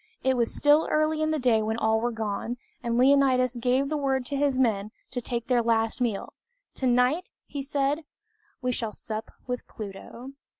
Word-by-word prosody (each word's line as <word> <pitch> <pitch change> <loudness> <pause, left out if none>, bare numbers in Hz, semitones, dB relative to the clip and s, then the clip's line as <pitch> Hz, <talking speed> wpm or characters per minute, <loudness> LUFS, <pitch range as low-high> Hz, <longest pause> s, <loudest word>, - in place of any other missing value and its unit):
It 265 0 +3
was 235 -2 +1
still 295 +2 +4
early 310 0 +1
in 310 - +1
the 315 - +1
day 245 -5 +3
when 220 +1 -1
all 220 -1 +2
were 240 +1 0
gone, 225 +2 -3 0.2
and 235 -2 -1
Leonidas 260 -1 +4
gave 255 +3 +2
the 305 +1 -1
word 265 -3 0
to 285 - -3
his 280 -2 +1
men 215 -5 +1 0.2
to 245 - -3
take 235 -1 -3
their 245 -2 +3
last 225 +1 +1
meal. 225 -5 -1 0.4
"Tonight," 255 +7 +2 0.2
he 285 - -5
said, 280 +2 0 0.6
"we 250 - +1
shall 230 -3 -2
sup 215 +1 -5 0.2
with 250 0 -4
Pluto." 220 +4 -8
250 Hz, 180 wpm, -27 LUFS, 230-275 Hz, 0.6 s, still